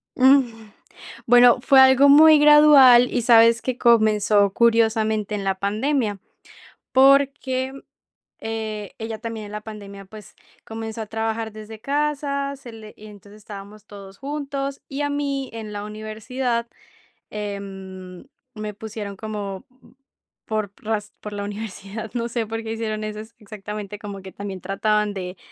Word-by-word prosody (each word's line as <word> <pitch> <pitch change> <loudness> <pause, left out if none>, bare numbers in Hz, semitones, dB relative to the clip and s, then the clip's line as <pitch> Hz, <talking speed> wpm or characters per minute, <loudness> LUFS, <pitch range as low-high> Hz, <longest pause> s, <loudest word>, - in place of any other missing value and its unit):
Mm. 250 -5 +3 0.6
Bueno, 245 +1 +6
fue 270 +1 +5
algo 265 +1 +6
muy 310 +1 +8
gradual 290 -5 +7
y 245 - 0
¿sabes 230 0 +5
que?, 255 -1 -3
comenzó 215 -4 +3
curiosamente 220 -2 +1
en 200 - -4
la 195 0 0
pandemia. 210 +2 -1 0.7
Porque, 270 -1 +3 0.7
eh, 220 -2 -5
ella 225 0 -5
también 225 -2 -6
en - - -12
la 210 0 -6
pandemia, 200 -2 -10
pues, 210 +1 -14 0.3
comenzó 225 0 -6
a - - -5
trabajar 225 +1 -3
desde 215 +1 -11
casa, 280 0 -2
se 255 -3 -12
le 220 -1 -12
y 215 - -13
entonces, 205 0 -15
estábamos 205 0 -11
todos 195 -1 -13
juntos, 280 -1 -5
y 275 +1 -5
a 290 - -1
mí 280 -2 -3
en 220 -2 -7
la 205 0 -5
universidad, 225 +3 -4 0.6
em, 195 -3 -8 0.3
me 215 -2 -6
pusieron 210 -1 -7
como 200 -2 -6 0.8
por 215 -3 -3
raz 210 -1 -4
por 210 - -7
la 205 0 -4
universidad, 205 +1 -7
no 235 -1 -2
sé 235 -1 -2
por 225 +1 -4
qué 225 0 -4
hicieron 215 -1 -4
eso 215 0 -5
ex 220 +1 -11
exactamente, 210 -1 -8
como 200 -2 -8
que 190 0 -11
también 195 -2 -7
trataban 210 +2 0
de 180 -1 -6
220 Hz, 145 wpm, -22 LUFS, 205-250 Hz, 0.8 s, muy